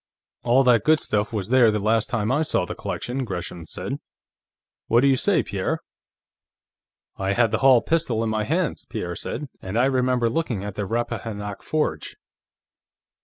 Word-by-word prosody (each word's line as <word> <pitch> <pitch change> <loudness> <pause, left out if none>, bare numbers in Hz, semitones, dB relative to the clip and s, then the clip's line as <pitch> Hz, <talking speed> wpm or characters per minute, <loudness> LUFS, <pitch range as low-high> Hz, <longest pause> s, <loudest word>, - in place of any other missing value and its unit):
"All 125 +3 +4
that 125 -3 +4
good 155 0 +4
stuff 105 -5 0
was 105 -3 -3
there 125 -2 +6
the 105 - +1
last 110 +2 +1
time 110 -1 0
I 145 +4 +2
saw 145 - +1
the - - -5
collection," 130 +2 -4
Gresham 90 -5 -6
said. - - -5 0.9
"What 120 +1 +4
do 140 - +4
you 135 - +5
say, - - +2
Pierre?" - - -2 1.4
"I 95 0 0
had 115 0 +2
the 110 - 0
Hall 130 -3 +6
pistol 140 -9 0
in 115 - -1
my 110 -1 0
hands," 165 - -1
Pierre 95 -7 -4
said. 150 - -5
"And 95 +4 -4
I 125 - +4
remember 125 -2 +2
looking 115 -6 -2
at 105 -1 -5
the 105 0 -4
Rappahannock 105 -2 -3
Forge." 150 - -2
115 Hz, 170 wpm, -24 LUFS, 105-130 Hz, 1.4 s, there